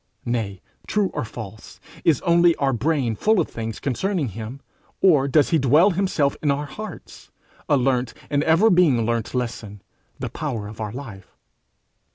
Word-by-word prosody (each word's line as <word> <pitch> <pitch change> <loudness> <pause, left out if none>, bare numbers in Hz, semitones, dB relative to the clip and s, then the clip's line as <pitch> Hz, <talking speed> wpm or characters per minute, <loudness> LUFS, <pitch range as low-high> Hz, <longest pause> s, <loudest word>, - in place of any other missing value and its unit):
Nay, 110 -6 -3 0.2
true 205 -3 0
or - - -2
false, 110 -2 -9 0.2
is 155 -6 +3
only 170 -1 +4
our 135 -1 0
brain 130 -1 0
full 215 - +2
of 165 - +1
things 110 -1 -6
concerning 155 - -1
him, 110 +6 -7 0.4
or 150 -8 +4
does 145 +1 +3
he 165 - +4
dwell 150 +9 +5
himself 170 -6 0
in 150 - 0
our 140 +1 0
hearts, 215 +10 -10 0.4
a 145 - +4
learnt, 125 -2 0
and 145 0 +1
ever 165 +8 +4
being 155 -11 +4
learnt 115 +1 -2
lesson, 115 -5 -4 0.3
the - - -4
power 120 -9 -4
of 110 +1 -9
our 105 -1 -3
life? 110 -7 -10
135 Hz, 165 wpm, -23 LUFS, 115-165 Hz, 0.4 s, dwell